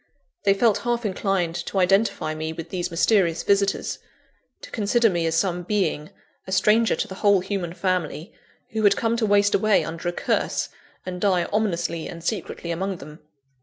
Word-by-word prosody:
They 195 -1 +5
felt 220 0 +3
half 240 -1 -1
inclined 190 -3 0
to - - -3
identify 190 -3 +2
me 155 +1 -4
with 165 0 -8
these 180 -1 -3
mysterious 170 0 +2
visitors 200 0 +1 0.6
to - - -11
consider 225 +1 +2
me 170 -2 0
as 160 - 0
some 180 0 0
being, 175 -6 -1 0.4
a - - -6
stranger 215 +4 +3
to - - -2
the 190 - -8
whole 200 -2 +5
human 185 -3 -3
family, 180 -2 -2 0.4
who 220 - -2
had 205 -2 +4
come 230 0 +1
to 225 -2 +1
waste 205 0 +3
away 215 0 +3
under 165 +2 -4
a - - -1
curse, - - -1 0.4
and 180 -1 -5
die 185 -4 +3
ominously 170 -6 -1
and 170 -1 -9
secretly 170 -2 -3
among 190 +3 -2
them. 150 +2 -11
190 Hz, 175 wpm, -24 LUFS, 170-205 Hz, 0.6 s, They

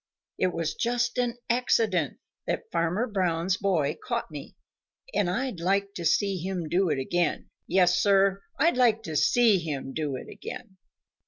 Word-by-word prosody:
It - - +3
was 165 -3 -2
just 240 +1 0
an 245 -1 0
accident 225 - +1 0.3
that - - -3
Farmer 170 +7 0
Brown's 185 -4 0
boy 165 -8 0
caught - - -3
me, - - -9 0.6
and 180 - +1
I'd 240 0 -2
like 200 +3 0
to 170 - -5
see 195 +3 +2
him 180 -1 -3
do 180 +3 +2
it 150 - +1
again. 170 +5 -1 0.2
Yes, 180 0 +3
Sir, 195 -1 +3 0.2
I'd 330 -4 +3
like 230 -3 +3
to 160 -6 -5
see 210 +7 +4
him 140 -5 -4
do 150 -3 -2
it - - -7
again!" 190 - -9
190 Hz, 160 wpm, -27 LUFS, 165-215 Hz, 0.6 s, see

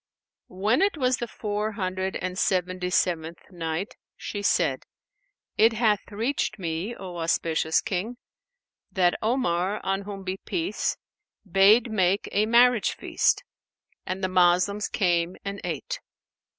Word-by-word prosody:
When 205 - +1
it 395 -3 +2
was 255 -2 +2
the 240 - -4
Four 210 0 -3
Hundred 190 -2 -2
and 180 0 -3
Seventy 185 -1 0
seventh 170 -1 -1
Night, 170 +6 -4 0.2
She 205 - -5
said, 205 - +1 0.7
It 225 +1 +6
hath 220 -2 +1
reached 225 +1 -1
me, 175 +5 -3
O 180 -2 -8
auspicious 165 -1 +1
King, 210 +6 -3 0.7
that 180 -2 +3
Omar 210 -5 0
(on 195 0 -1
whom 200 -1 -7
be 190 0 -3
peace!) 335 - -2 0.5
bade 205 +6 +5
make 190 -1 +1
a 210 +2 +2
marriage 240 -1 +4
feast; - - +1 0.6
and 185 +2 -4
the - - +2
Moslems 185 +3 +3
came 175 -2 +1
and 200 0 -4
ate. 165 -5 -4
195 Hz, 130 wpm, -26 LUFS, 180-215 Hz, 0.7 s, It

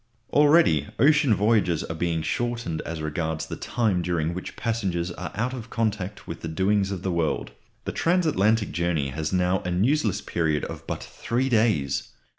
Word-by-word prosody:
Already 145 - +5
ocean 145 -2 +4
voyages 100 -5 +2
are - - -5
being 80 -1 -1
shortened 115 -1 -2
as 80 -2 -4
regards 80 +1 -2
the - - -6
time 105 -7 0
during 85 -2 -1
which 90 - -6
passengers 95 -7 -1
are 90 +1 -6
out 120 +5 -1
of 120 -2 -7
contact 105 -4 -2
with 85 - -6
the - - -4
doings 95 +4 +1
of 95 -2 -4
the 95 - 0
world. 85 -2 -1 0.3
The - - -2
transatlantic 115 - +2
journey 85 -5 0
has 75 +3 -3
now 90 0 +2
a 90 - -5
newsless 110 +5 +1
period 80 -4 0
of - - -8
but - - -4
three 125 +3 -2
days. 110 - +1
95 Hz, 170 wpm, -25 LUFS, 85-115 Hz, 0.3 s, Already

